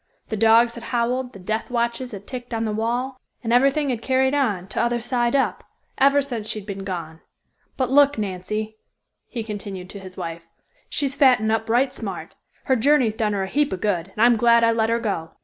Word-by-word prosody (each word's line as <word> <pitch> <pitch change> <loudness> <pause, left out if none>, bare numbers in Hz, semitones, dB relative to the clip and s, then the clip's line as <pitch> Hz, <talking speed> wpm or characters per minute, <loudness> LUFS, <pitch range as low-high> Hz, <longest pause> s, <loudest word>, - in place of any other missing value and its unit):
The 220 - -2
dogs 225 +2 +5
had 235 0 -9
howled, 250 +1 -1
the - - -10
death 215 +4 -3
watches 235 +1 -1
had 200 -2 -8
ticked 245 -1 -6
on 225 0 -1
the 215 - -1
wall, 245 +4 -2 0.2
and 230 0 0
everything 275 +3 +3
had 235 -3 -3
carried 265 +1 +2
on, 220 -11 0
t'other 240 +4 0
side 240 +1 0
up, 270 - 0 0.4
ever 280 +1 +5
since 235 -6 -5
she'd 215 -3 -5
been 195 -1 -6
gone. 165 -4 -6 0.6
But 260 -1 0
look, 285 0 +5
Nancy," 215 +2 -4 0.5
he 235 -3 -5
continued 200 -4 -7
to 200 - -8
his 185 -1 -11
wife, 165 0 -5 0.5
"she's 275 -2 -1
fattin' 250 -6 +4
up 225 0 -1
right 255 +3 +2
smart. - - -6 0.3
Her 265 - +2
journey 280 +3 +4
has 215 -1 -1
done 215 -2 0
her 195 -1 -1
a - - -3
heap 290 +7 +1
of 190 - -4
good, 185 -5 0
and 215 - +3
I'm 240 -1 +5
glad 235 +1 +5
I 230 - +5
let 225 -1 +1
her 230 - +2
go." 195 -8 -3
230 Hz, 210 wpm, -23 LUFS, 210-255 Hz, 0.6 s, dogs